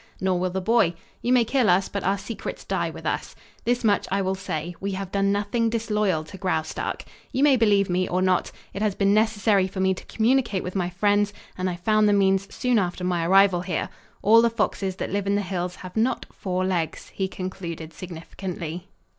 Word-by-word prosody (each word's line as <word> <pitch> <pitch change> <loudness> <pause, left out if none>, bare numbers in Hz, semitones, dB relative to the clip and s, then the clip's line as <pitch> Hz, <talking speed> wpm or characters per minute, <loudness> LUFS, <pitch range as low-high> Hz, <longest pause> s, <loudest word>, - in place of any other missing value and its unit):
Nor 185 -1 +1
will 185 +1 0
the 190 +1 -3
boy. 200 -4 +3 0.3
You 245 - 0
may 245 -2 +5
kill 245 -2 +2
us, 185 +2 +4
but 200 - -4
our 195 +2 +1
secrets 205 +3 -6
die - - -1
with - - -10
us. - - -2 0.3
This 245 +1 +1
much 205 -2 +2
I 195 - +2
will 190 0 0
say: 175 -3 -4
we 200 0 -3
have 190 -1 -5
done 200 0 +2
nothing 210 +3 0
disloyal 210 -7 0
to 190 +4 -11
Graustark. 170 -5 -2 0.3
You 265 - +1
may 290 -2 +6
believe 205 -4 +3
me 180 +1 0
or 180 - +1
not. 185 -1 +1 0.2
It 200 - -5
has 210 -3 +1
been 200 0 +3
necessary 210 -3 +3
for 190 0 -7
me 190 0 +3
to 185 - -9
communicate 230 -4 +1
with 180 - -5
my 180 -2 0
friends, 205 +2 +1 0.2
and 185 0 -1
I 180 - -3
found 215 +4 +3
the - - +4
means 195 -1 +2
soon 250 -3 +1
after 180 -1 -2
my 175 -2 0
arrival 190 -1 +5
here. 180 0 -2 0.3
All 225 +3 +7
the 235 - +4
foxes 205 -4 -1
that - - -4
live 200 0 -1
in 200 - +2
the 205 - 0
hills 180 -1 -3
have 185 -1 -10
not 235 +3 +1
four 185 -1 -2
legs," 175 -4 -2
he 190 - -2
concluded 170 -4 -6
significantly. 175 +1 -6
195 Hz, 215 wpm, -25 LUFS, 180-210 Hz, 0.3 s, All